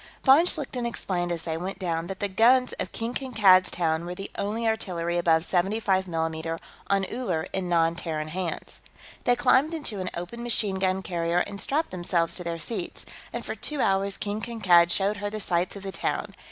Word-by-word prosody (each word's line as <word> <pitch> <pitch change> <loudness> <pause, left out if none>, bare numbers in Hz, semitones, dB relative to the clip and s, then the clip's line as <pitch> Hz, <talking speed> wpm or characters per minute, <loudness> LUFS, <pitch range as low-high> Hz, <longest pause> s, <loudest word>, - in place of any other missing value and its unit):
Von 275 +4 +7
Schlichten 260 -7 -1
explained, 175 -6 -2
as 165 -1 -2
they 160 -1 -2
went 185 +3 -4
down, 170 -3 -2
that 190 0 -6
the 205 - 0
guns 245 +6 +4
of - - -3
King 230 +1 -3
Kankad's 210 -9 +4
Town 160 -1 +1
were 175 +1 -5
the 195 - -7
only 220 +3 -2
artillery 175 -6 -1
above 165 -1 +3
75 190 +1 +1
mm 165 -1 -2 0.3
on 195 -1 +2
Uller 190 -9 -2
in 185 -2 -2
non 165 -1 +3
Terran 155 -3 -3
hands. 175 0 -4 0.4
They 245 - +4
climbed 280 +6 +3
into 235 -10 -4
an 180 - -2
open 175 +8 -6
machine 215 -5 +1
gun 190 0 +1
carrier 170 0 0
and 200 0 -7
strapped 310 +4 0
themselves 175 -2 0
to 180 - -4
their 170 -1 -3
seats, 180 +2 -5 0.3
and - - -5
for - - -3
two 300 -2 -4
hours 195 -2 +1
King 210 +1 -3
Kankad 185 -8 +4
showed 200 +3 +2
her 205 0 -3
the 215 +1 -5
sights 180 -1 0
of 200 - -8
the 195 - -4
town. - - -2
190 Hz, 195 wpm, -26 LUFS, 170-220 Hz, 0.4 s, Von